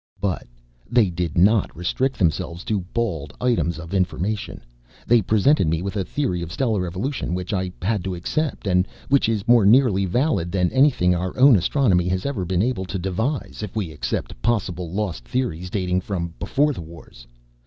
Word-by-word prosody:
"But 95 -4 -2 0.4
they 115 -6 +3
did 85 -1 -3
not 100 +2 +3
restrict 130 +10 -1
themselves 85 -1 -1
to 105 -2 -1
bald 80 - -2
items 110 -10 +1
of 85 +2 -8
information. 95 +2 -2 0.4
They 120 -1 +4
presented 110 - +3
me 80 +2 0
with 100 +2 -4
a 100 - 0
theory 95 -8 -2
of 85 -1 -6
stellar 110 -7 0
evolution 95 - -3
which 90 +2 -4
I 95 -2 -1
had 105 -1 0
to 95 -1 -2
accept 145 - -2
and 90 -1 +2 0.2
which 140 -4 +3
is 110 -1 -1
more 120 -2 +6
nearly 105 -2 +4
valid 95 - 0
than 90 -2 +1
anything 130 -10 +4
our 90 +1 -3
own 130 -1 +7
astronomy 90 - +2
has 90 +1 -1
ever 125 -10 -2
been 90 +2 +1
able 115 -6 -1
to 95 +2 -4
devise, 110 - -3
if 105 -1 -6
we 100 -7 -2
except 70 -4 -4
possible 90 -7 -1
lost 95 - -3
theories 90 - -2
dating 90 -1 0
from 85 -3 -4
Beforethewars. 85 - -3
95 Hz, 175 wpm, -22 LUFS, 90-115 Hz, 0.4 s, own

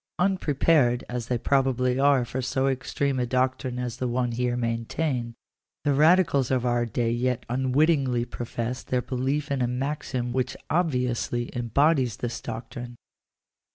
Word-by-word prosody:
Unpre 180 -6 +1
pared 125 -7 +4
as 125 -2 -4
they 125 - 0
probably 130 0 +1
are 140 -3 +4
for 130 +2 -4
so 130 +1 0
extreme 135 0 -1
a 125 - 0
doctrine 130 0 0
as 125 -2 -3
the 125 - -1
one 120 0 0
here 120 +1 -1
maintained, 120 +1 -2 0.5
the 145 - +2
radicals 150 -3 +4
of 130 -2 +1
our 120 -1 +1
day 115 +1 0
yet 125 +1 -1
unwittingly 130 0 +2
profess 120 0 -4
their 125 -1 -1
belief 135 +3 -2
in 135 -2 0
a 125 - +2
maxim 125 -1 -2
which 130 0 -1
obviously 125 -7 0
embodies 125 +1 +2
this 120 -1 -4
doctrine. 120 +2 -7
125 Hz, 150 wpm, -26 LUFS, 120-135 Hz, 0.5 s, pared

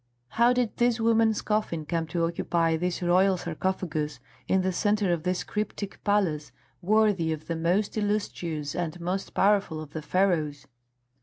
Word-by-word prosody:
How 235 - +4
did 250 -3 0
this 240 -1 +2
woman's 225 -1 +3
coffin 210 -7 -1
come 165 +1 -2
to 165 +1 0
occupy 165 -1 0
this 180 +2 -2
royal 185 +2 +4
sarcophagus, 155 -4 -3 0.3
in 190 0 +2
the 185 - +1
centre 205 -1 +1
of 170 - -2
this 180 +2 -1
cryptic 210 -1 -4
palace 180 -8 +1 0.3
worthy 200 -4 +2
of 155 -1 -4
the 165 - -3
most 175 +6 0
illustrious 180 -8 -2
and 175 -1 -3
most 180 +3 -3
powerful 195 -5 +2
of 155 -2 -9
the 155 - -4
Pharaohs? 160 -4 0
180 Hz, 155 wpm, -27 LUFS, 165-205 Hz, 0.3 s, How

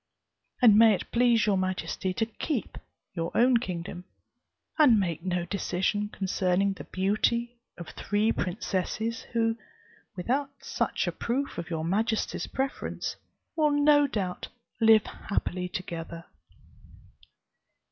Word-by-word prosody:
And 215 -4 +8
may 225 -2 +7
it - - -8
please 235 -2 +4
your 200 -3 +2
majesty 185 0 -2
to 225 +4 0
keep 230 - -4 0.3
your 165 -2 -2
own 245 +1 +5
kingdom, 180 -4 -5 0.7
and 250 -8 +7
make 170 -5 -1
no 180 -1 -1
decision 200 +2 -1
concerning 190 0 0
the 160 -7 -10
beauty 235 +5 0 0.2
of 170 - -8
three 210 +2 0
princesses, 215 +5 -2
who, 225 -1 +1 0.6
without 260 +10 -1
such - - -1
a - - -1
proof 260 -2 -2
of 170 - -6
your 160 -2 -2
majesty's 220 +5 -1
preference, 270 +1 -3 0.4
will 310 -2 +3
no 290 0 +4
doubt 190 -8 -3 0.3
live 220 -2 +6
happily 180 -3 -3
together!" 170 -3 -6
205 Hz, 120 wpm, -28 LUFS, 180-235 Hz, 0.7 s, And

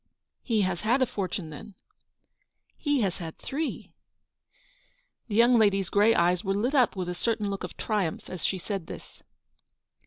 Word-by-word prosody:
"He 225 -4 +1
has 185 -3 -1
had 245 +5 +3
a - - +3
fortune, 185 -6 -4
then? 205 +6 -10 0.3
" - - -51
" - - -45
He 290 -4 0
has 195 -4 -1
had 165 -2 -7
three." 305 +3 -4 1.3
The 210 - -3
young 235 +1 +6
lady's 195 -3 +3
grey 210 +3 +4
eyes 175 +2 +2
were 195 -1 0
lit 240 +7 0
up 255 -7 +4
with 185 -2 -3
a 180 - -2
certain 210 +2 -1
look 195 - -4
of - - -7
triumph 205 -7 -2
as 185 -3 -7
she 190 - +1
said 190 -1 -4
this. - - -10
205 Hz, 180 wpm, -27 LUFS, 185-230 Hz, 1.3 s, young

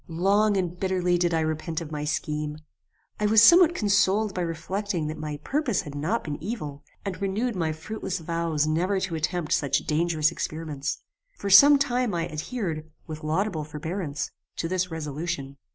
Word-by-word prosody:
"Long 200 +5 +2
and 180 -1 -2
bitterly 180 -2 +1
did 175 -1 +2
I 165 -1 +1
repent 155 +1 -2
of 160 -3 -8
my 150 -1 -3
scheme. 150 0 -2 0.6
I 210 - +2
was 220 +1 +6
somewhat 345 +4 +7
consoled 205 0 +2
by 185 - -2
reflecting 175 +2 -2
that 155 +1 -4
my 150 -1 -4
purpose 275 - 0
had 145 - -8
not 160 +11 -1
been 145 -2 -5
evil, 150 -11 -5 0.2
and 195 -1 -4
renewed 210 +5 -1
my 165 -3 0
fruitless 190 +4 -4
vows 165 -2 -1
never 180 +6 +1
to 185 -2 -3
attempt 160 0 -2
such 140 - +1
dangerous 160 0 +2
experiments. 155 -3 -4 0.3
For 200 - -3
some 285 +9 +9
time 250 -6 0
I 170 0 -1
adhered, 160 -2 -4 0.2
with 155 0 -7
laudable 160 +1 0
forbearance, 150 0 -4 0.2
to 165 - -2
this 185 +1 -1
resolution. 150 -3 -4
170 Hz, 170 wpm, -26 LUFS, 155-200 Hz, 0.6 s, some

